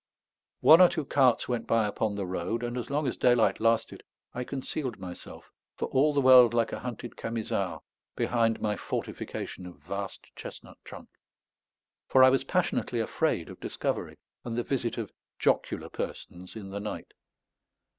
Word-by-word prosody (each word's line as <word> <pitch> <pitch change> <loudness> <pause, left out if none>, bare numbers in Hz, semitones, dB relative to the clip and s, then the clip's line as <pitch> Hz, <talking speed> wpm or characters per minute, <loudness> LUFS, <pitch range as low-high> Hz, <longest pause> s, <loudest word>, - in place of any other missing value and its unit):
One 160 +3 +8
or 180 - +8
two 155 -4 -3
carts 130 -3 +3
went 120 -2 -2
by 115 -1 +3
upon 105 0 -1
the 100 -1 -3
road; 95 +6 -3
and 120 0 -3
as 125 - -4
long 145 +2 0
as 130 - -1
daylight 120 -2 +3
lasted 115 0 +1 0.3
I 125 - -3
concealed 130 -1 -4
myself, 90 -2 -10 0.2
for - - -3
all 145 +3 +3
the 145 -1 +1
world 125 -3 +7
like 115 -1 +2
a - - -3
hunted 120 -1 -6
Camisard, 110 -5 -3 0.3
behind 115 -2 +1
my 105 -1 0
fortification 90 - -5
of 90 - -11
vast 100 +7 -7
chestnut - - -10
trunk; - - -11 1.0
for 130 - +6
I 130 - +8
was 135 - +2
passionately - - 0
afraid - - 0
of - - -11
discovery - - -3 0.3
and 115 -1 -4
the 120 - 0
visit 120 -4 -2
of - - -4 0.3
jocular - - 0
persons 90 +3 -7
in 100 -3 -8
the 100 - -4
night. 105 +1 -6
115 Hz, 165 wpm, -28 LUFS, 105-130 Hz, 1.0 s, One